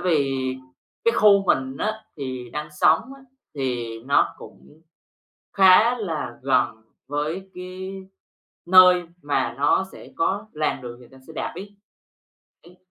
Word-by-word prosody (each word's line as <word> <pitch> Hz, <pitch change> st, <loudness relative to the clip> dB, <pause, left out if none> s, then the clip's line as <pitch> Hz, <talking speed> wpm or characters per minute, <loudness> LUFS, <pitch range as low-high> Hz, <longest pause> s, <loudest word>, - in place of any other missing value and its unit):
vì 150 Hz, -7 st, +1 dB, 0.7 s
cái 465 Hz, -, +4 dB
khu 200 Hz, -, +5 dB
mình 130 Hz, -2 st, +1 dB
á 215 Hz, -, 0 dB, 0.2 s
thì 130 Hz, -4 st, -6 dB
đang 150 Hz, 0 st, -4 dB
sống 150 Hz, -, +3 dB, 0.2 s
á 275 Hz, -, -18 dB, 0.3 s
thì 120 Hz, -5 st, -3 dB
nó 140 Hz, +1 st, +2 dB
cũng 155 Hz, +2 st, -15 dB, 0.7 s
khá 200 Hz, +6 st, +6 dB
là 160 Hz, -, -4 dB
gần 125 Hz, -4 st, +1 dB, 0.3 s
với 155 Hz, +7 st, -3 dB
cái 185 Hz, +1 st, -7 dB, 0.7 s
nơi 180 Hz, 0 st, +7 dB, 0.2 s
mà 145 Hz, -4 st, -1 dB
nó 145 Hz, +6 st, +2 dB
sẽ -, -, -13 dB
có 195 Hz, +6 st, -1 dB
làn 150 Hz, -3 st, -2 dB
đường 120 Hz, 0 st, -9 dB
dành 120 Hz, -, -17 dB
cho 135 Hz, -, -16 dB
xe 160 Hz, -, -12 dB
đạp -, -, -4 dB
ấy. 200 Hz, +2 st, -10 dB, 0.9 s
Ấy. 180 Hz, +1 st, -18 dB
155 Hz, 140 wpm, -23 LUFS, 135-190 Hz, 0.9 s, nơi